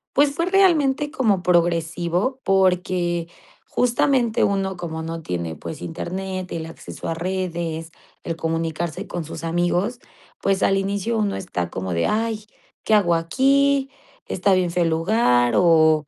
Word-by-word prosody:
Pues, 285 +1 +4
fue 335 - 0
realmente 300 -7 +3
como 210 - +1
progresivo 175 +6 +1
porque 180 -3 +1 0.4
justamente 245 -1 +2
uno 195 -1 0
como 160 -2 -5
no 165 0 -5
tiene 85 - -4
pues 155 - -8
internet, 185 +2 -5
el 160 -1 -4
acceso 165 - -9
a 165 - 0
redes, 170 -2 -3 0.3
el 165 - -3
comunicarse 165 0 -3
con 175 -2 -4
sus 160 +1 -8
amigos, 175 +8 0 0.4
pues, 195 -1 +1
al 195 - +3
inicio 200 +4 -1
uno 205 -2 0
está 90 - -3
como 95 -1 -4
de: 85 - +1
"Ay, 220 -1 -1 0.4
¿qué 220 - +1
hago 175 -5 +3
aquí? 270 +9 +2 0.4
Está 190 +1 +1
bien 180 -2 +2
feo 175 0 +1
el 165 - +1
lugar". 160 - +2
O, 160 -3 +4
180 Hz, 145 wpm, -22 LUFS, 165-215 Hz, 0.4 s, Pues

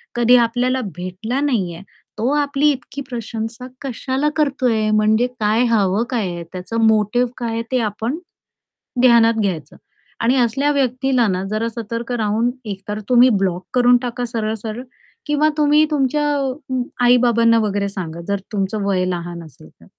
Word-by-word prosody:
कधी 240 +1 +5
आपल्याला 250 +3 0
भेटला 185 +8 -4
नाहीये, 190 -12 -1 0.4
तो 235 +4 0
आपली 290 0 +2
इतकी 270 +1 -6
प्रशंसा 230 0 -5
कशाला 270 +2 -1
करतोय 250 -7 +1
म्हणजे 215 +3 +3
काय 215 +3 +3
हवं 205 0 +2
काय 230 -6 0
आहे, 170 -1 -5
त्याचा 185 +5 -5
मोटिव्ह 220 +3 +3
काय 235 -2 -3
आहे, 230 - -1
ते 255 - +2
आपण 225 +6 -2 0.8
ध्यानात 235 -2 +6
घ्यायचं. 180 -7 -3 0.5
आणि 240 +3 +3
असल्या 270 +5 +1
व्यक्तीला 255 -2 +1
ना 185 -1 -1
जरा 215 +2 -1
सतर्क 230 +1 -5
राहून 225 +1 0
एकतर 205 0 -5
तुम्ही 250 0 +6
ब्लॉक 180 -1 -1
करून 245 0 +5
टाका 245 0 -3
सरळ-सरळ 225 0 -4 0.4
किंवा 295 +1 +2
तुम्ही 300 +1 +4
तुमच्या 295 +1 +1 0.8
आई-बाबांना 235 -2 +4
वगैरे 205 -2 -1
सांगा 170 -4 -6
जर 200 0 0
तुमचं 200 +1 -1
वय 190 -2 +1
लहान 175 -1 -4
असेल 155 0 -15
तर. - - -22
230 Hz, 145 wpm, -19 LUFS, 205-250 Hz, 0.8 s, ध्यानात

